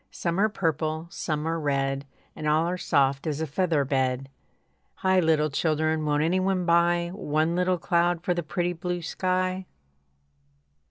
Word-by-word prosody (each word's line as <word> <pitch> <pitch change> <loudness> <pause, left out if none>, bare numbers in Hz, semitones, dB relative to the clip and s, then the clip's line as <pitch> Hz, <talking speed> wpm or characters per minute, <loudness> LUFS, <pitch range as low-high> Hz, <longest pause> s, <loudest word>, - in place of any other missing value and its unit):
Some 170 +1 -2
are 215 +2 +4
purple, 160 -4 -1
some 155 -2 -3
are 165 0 -1
red, 140 -1 -1 0.3
And 150 - -4
all 155 +2 +3
are 180 - -1
soft 140 -5 +1
as 150 -1 -2
a 160 - -1
feather 160 -1 0
bed. 130 0 0 0.7
Hi! 190 0 +2
Little 155 -3 +2
children, 155 +1 0
won't 150 0 +1
any 175 +4 +2
one 185 -1 0
buy 170 0 +3
One 160 -3 0
little 180 0 +1
cloud 175 0 +1
for 180 - +1
the 175 - -2
pretty 175 +2 -2
blue 175 +1 -4
sky? 185 +1 -1
165 Hz, 160 wpm, -26 LUFS, 150-180 Hz, 0.7 s, are